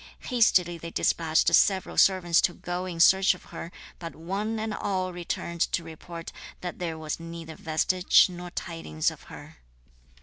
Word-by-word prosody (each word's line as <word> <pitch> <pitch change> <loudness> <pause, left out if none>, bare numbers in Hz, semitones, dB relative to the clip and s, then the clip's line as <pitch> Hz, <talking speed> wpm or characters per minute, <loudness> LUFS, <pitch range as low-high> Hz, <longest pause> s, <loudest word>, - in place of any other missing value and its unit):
Hastily 180 -8 +3
they 170 - -7
despatched 165 0 +1
several 190 +1 +3
servants 180 -3 +4
to 175 - +1
go 180 +1 -4
in 170 -2 -6
search 190 +2 +6
of - - -16
her, 170 - -7 0.3
but 165 -1 -7
one 200 +7 -3
and 220 0 -3
all 185 -3 -2
returned 170 -1 -5
to 170 - 0
report 165 +1 -9 0.3
that 180 -1 -6
there 165 -3 -3
was 155 0 -4
neither 165 -1 -8
vestige 180 +4 +3
nor 180 -1 -8
tidings 165 - -3
of - - -14
her. - - -12
175 Hz, 160 wpm, -27 LUFS, 165-185 Hz, 0.3 s, search